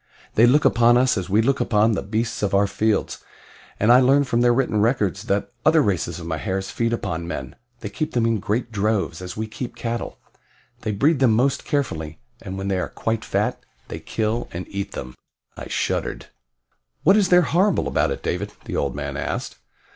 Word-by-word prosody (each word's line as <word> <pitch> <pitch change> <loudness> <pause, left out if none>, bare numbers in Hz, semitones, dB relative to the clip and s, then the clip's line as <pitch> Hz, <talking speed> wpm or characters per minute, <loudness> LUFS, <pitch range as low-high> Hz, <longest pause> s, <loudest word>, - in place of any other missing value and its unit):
They 115 +2 +5
look 145 +5 +4
upon 120 +1 +5
us 125 0 +3
as 95 -3 -3
we 105 +3 +3
look 135 +3 +1
upon 110 0 +3
the 105 - -1
beasts 110 +3 -2
of 100 -1 0
our 100 +1 +4
fields, 110 +1 0 0.6
and 110 +3 +4
I 125 - +8
learn 135 +2 +4
from 120 -3 0
their 120 0 +5
written 120 -4 +1
records 105 -4 0
that 100 -3 -1
other 155 0 +5
races 90 -4 -1
of 80 - -8
Mahars 95 +4 -3
feed 115 0 -1
upon 85 -7 -3
men 65 -6 -6 0.3
they 105 - -5
keep 155 +8 -3
them 120 -2 +2
in 115 -2 +1
great 110 +4 -2
droves, 100 -5 -1
as 90 +1 -7
we 110 - -2
keep 115 +2 -7
cattle. 120 0 -4 0.6
They 110 - -2
breed 140 +9 +2
them 125 -4 +4
most 130 +5 +1
carefully, 80 - -2 0.2
and 95 0 -6
when 95 0 -4
they 95 -1 0
are - - -3
quite 110 -1 -2
fat, - - -1 0.3
they - - -5
kill 110 +2 -2
and 90 +1 -5
eat 100 0 -5
them." 65 0 -6 0.4
I - - -8
shuddered. - - -2 0.7
"What 195 +5 +6
is 200 -3 +3
there 180 0 +6
horrible 185 +4 +2
about - - +1
it, - - -4
David?" - - -3
the - - -5
old 70 -3 -1
man 70 -1 -4
asked. - - -4
110 Hz, 200 wpm, -22 LUFS, 95-125 Hz, 0.7 s, I